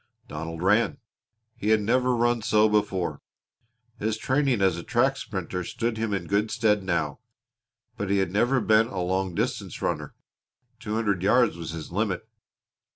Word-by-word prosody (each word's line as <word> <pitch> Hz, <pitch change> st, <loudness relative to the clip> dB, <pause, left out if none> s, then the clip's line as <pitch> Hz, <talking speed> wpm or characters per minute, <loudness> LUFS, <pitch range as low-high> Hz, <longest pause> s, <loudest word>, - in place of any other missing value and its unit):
Donald 80 Hz, +2 st, -6 dB
ran. 110 Hz, +8 st, +3 dB, 0.6 s
He 105 Hz, -, -2 dB
had 110 Hz, 0 st, +5 dB
never 125 Hz, +4 st, +2 dB
run 120 Hz, 0 st, +2 dB
so 110 Hz, 0 st, +4 dB
before. 100 Hz, -4 st, 0 dB, 0.8 s
His 110 Hz, +1 st, -1 dB
training 130 Hz, 0 st, +1 dB
as 95 Hz, -3 st, +3 dB
a 85 Hz, -, -5 dB
track -, -, +2 dB
sprinter 90 Hz, 0 st, -4 dB
stood 115 Hz, +5 st, -2 dB
him 110 Hz, -1 st, -1 dB
in 95 Hz, -4 st, -2 dB
good 100 Hz, +4 st, +1 dB
stead 105 Hz, -3 st, +2 dB
now. 85 Hz, -6 st, -1 dB, 0.8 s
But 105 Hz, -, -3 dB
he 100 Hz, -, +2 dB
had 95 Hz, -3 st, 0 dB
never 120 Hz, +7 st, +2 dB
been 110 Hz, +1 st, +4 dB
a 95 Hz, -, -5 dB
long 95 Hz, 0 st, -1 dB
distance -, -, -2 dB
runner. -, -, -3 dB, 0.6 s
Two 110 Hz, -2 st, -4 dB
hundred 100 Hz, -5 st, 0 dB
yards 115 Hz, +1 st, +3 dB
was 85 Hz, -2 st, -6 dB
his 80 Hz, 0 st, -7 dB
limit. 100 Hz, +1 st, -1 dB
105 Hz, 160 wpm, -26 LUFS, 95-115 Hz, 0.8 s, had